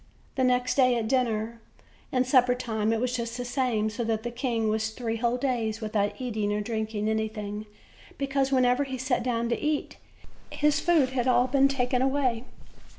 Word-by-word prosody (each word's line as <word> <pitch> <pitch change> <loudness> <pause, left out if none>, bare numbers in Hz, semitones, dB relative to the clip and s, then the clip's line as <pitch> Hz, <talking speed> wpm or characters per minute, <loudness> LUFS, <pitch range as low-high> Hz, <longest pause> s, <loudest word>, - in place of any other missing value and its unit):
The 260 - 0
next 250 0 +2
day 255 -2 +5
at 225 -2 -2
dinner 230 -2 0 0.5
and 255 0 +2
supper 250 -1 +4
time 220 -3 -1
it 225 - +1
was 250 +1 -1
just 235 -1 -4
the 245 - -4
same; 245 -4 0
so 235 +2 -3
that 220 -1 -1
the 240 - -3
king 235 -3 -1
was 220 +1 0
three 225 0 -3
whole 235 +1 0
days 235 -5 -1
without 215 0 -1
eating 215 -5 -2
or 210 - 0
drinking 220 -1 -2
anything, 215 -1 -3 0.5
because 275 -1 0
whenever 255 +1 +3
he 265 -2 -5
sat 260 0 0
down 235 -1 -1
to 235 - 0
eat, 300 -1 -1 0.5
his 300 0 +1
food 325 -7 +3
had 255 -1 -1
all 245 -1 +4
been 270 +1 +4
taken 250 -2 0
away. 260 -3 +1
245 Hz, 185 wpm, -27 LUFS, 220-260 Hz, 0.5 s, day